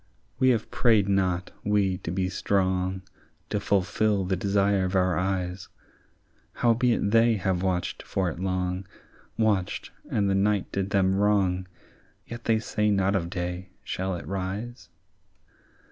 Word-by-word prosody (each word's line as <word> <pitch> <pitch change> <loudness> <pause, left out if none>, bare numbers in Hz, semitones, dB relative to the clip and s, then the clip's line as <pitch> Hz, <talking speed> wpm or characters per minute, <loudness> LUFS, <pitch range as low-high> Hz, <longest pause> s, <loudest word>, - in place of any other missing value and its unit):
"We 130 - +5
have 115 -3 0
prayed 110 -5 +3
not, 95 -2 0
we, 100 -3 +1
to - - -6
be 90 +1 0
strong, 95 -1 0 0.5
To 105 - 0
fulfil 100 0 +1
the 95 +1 0
desire 100 +1 +2
of 95 +1 -2
our 90 -1 +3
eyes; 90 0 -2 0.8
—Howbeit 120 -3 +2
they 115 0 +5
have 95 -2 -1
watched 90 -2 -1
for 95 -2 -1
it 85 0 -4
long, 95 0 -2 0.5
Watched, 105 -5 0 0.2
and 100 -1 +1
the 100 - +2
night 100 0 +1
did 95 0 -2
them 95 -2 +2
wrong, 95 -2 +2 0.6
Yet 120 0 -9
they 115 -1 +3
say 105 -1 0
not 100 -1 +2
of 85 -3 -1
day, 90 0 -4
shall 95 0 -2
it 85 - -7
rise? 100 +6 -5
95 Hz, 145 wpm, -26 LUFS, 95-105 Hz, 0.8 s, We